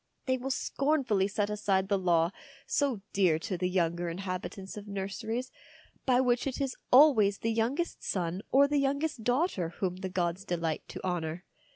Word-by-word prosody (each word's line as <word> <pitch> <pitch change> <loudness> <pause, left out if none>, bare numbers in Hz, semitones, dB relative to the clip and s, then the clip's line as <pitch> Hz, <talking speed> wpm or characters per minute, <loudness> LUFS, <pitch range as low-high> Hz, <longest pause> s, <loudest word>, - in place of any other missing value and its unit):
They 260 - +2
will 260 +1 -4
scorn 280 +2 0
fully 195 -5 +2
set 205 0 -1
aside 195 -2 +1
the 200 -1 +1
law, 170 -2 +2 0.3
so 270 -8 0
dear 180 -5 +3
to 185 +4 -4
the 180 +1 -1
younger 175 -1 0
inhabitants 190 +2 -5
of 210 0 -8
nurseries, 220 +5 -4 0.6
by 250 -1 +5
which 250 0 +1
it 270 - -3
is 270 -2 -1 0.2
always 245 -8 +6
the 225 +2 -1
youngest 245 +10 -1
son 180 0 -2
or 280 +2 +6
the 290 0 +1
youngest 280 -2 -1
daughter 245 - +1
whom 180 -2 -1
the 190 0 -4
gods 180 0 -1
delight 170 -5 -2
to - - -8
honour. 175 -1 -3
200 Hz, 175 wpm, -30 LUFS, 180-255 Hz, 0.6 s, always